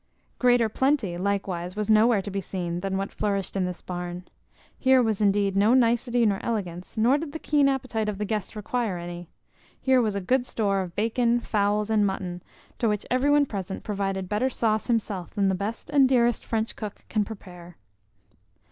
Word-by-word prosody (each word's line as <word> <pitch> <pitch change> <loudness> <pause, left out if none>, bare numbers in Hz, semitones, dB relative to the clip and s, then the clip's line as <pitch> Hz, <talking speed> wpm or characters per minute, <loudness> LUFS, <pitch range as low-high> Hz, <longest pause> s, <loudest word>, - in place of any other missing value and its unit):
Greater 245 -2 +4
plenty, 265 -5 0
likewise, 185 -2 -2
was 210 -1 -2
nowhere 215 -1 +4
to 200 - -6
be 195 0 -2
seen 175 -2 -4
than 190 +1 -2
what 195 0 -3
flourished 200 -3 -2
in 190 -2 +1
this 180 -1 -6
barn. 175 0 -5 0.6
Here 260 -1 +5
was 220 -4 +1
indeed 200 -1 +2
no 210 +5 +4
nicety 240 -1 +3
nor 200 -2 +2
elegance, 185 -5 -4
nor 245 +6 +4
did 300 -2 -6
the - - -3
keen 290 -3 +2
appetite 245 -5 -1
of 205 - -4
the 210 - -2
guests 210 0 -3
require 215 -2 -2
any. 175 0 -7 0.5
Here 260 -1 +3
was 215 -3 0
good 250 +6 +1
store 200 -3 0
of 175 -2 -7
bacon, 235 +2 +1
fowls, 210 -1 0
and 215 -1 +3
mutton, 185 -3 -2 0.4
to 230 - +2
which 210 -1 -1
every 255 +3 +2
one 290 0 +5
present 195 -5 -5
provided 195 -2 -2
better 210 +7 0
sauce 220 -3 0
himself 210 -7 -2
than 200 -2 +2
the - - +1
best 200 +8 -4
and 275 -3 +5
dearest 240 -2 +2
French 225 0 -1
cook 210 -2 -7
can 215 -2 +1
prepare. 180 -5 -11
210 Hz, 185 wpm, -26 LUFS, 190-235 Hz, 0.6 s, Here